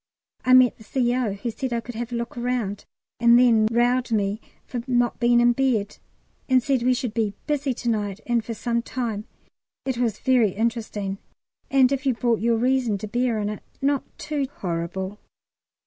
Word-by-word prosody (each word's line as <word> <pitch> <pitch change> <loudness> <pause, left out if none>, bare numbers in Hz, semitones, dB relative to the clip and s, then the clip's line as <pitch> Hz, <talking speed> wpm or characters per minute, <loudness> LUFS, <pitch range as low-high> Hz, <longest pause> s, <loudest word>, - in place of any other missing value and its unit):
I 255 0 +6
met 255 -1 +5
the - - -13
C.O., 245 -1 0
who 215 +4 -4
said 260 +3 -4
I 235 - 0
could 240 +1 -8
have 235 +1 -5
a - - -2
look 235 0 -4
round, 240 -5 -2 0.3
and 235 0 +6
then 230 -3 +5
rowed 240 +2 +1
me 205 0 0 0.2
for 245 - -4
not 245 -1 +1
being 240 -1 +4
in 240 0 +5
bed, 235 -6 0 0.5
and 255 -2 +4
said 270 -2 +1
we 250 +1 +3
should 245 -4 -3
be 215 -3 -1
busy 290 -2 0
to 240 - -6
night 205 -3 -1
and 240 -2 +1
for 230 0 -5
some 235 +1 -1
time. 230 -4 -4 0.6
It 260 -3 -2
was 230 -4 0
very 240 -7 +3
interesting, 215 -3 -2 0.5
and 265 -2 +4
if 275 0 -1
you 260 - +2
brought 235 -1 +1
your 230 +1 +2
reason 245 -3 +1
to 215 - -6
bear 240 +1 0
on 205 -1 -1
it, 210 - -6 0.2
not 280 0 +1 0.2
too 295 -3 -2
horrible. 185 - -4
235 Hz, 190 wpm, -24 LUFS, 215-255 Hz, 0.6 s, I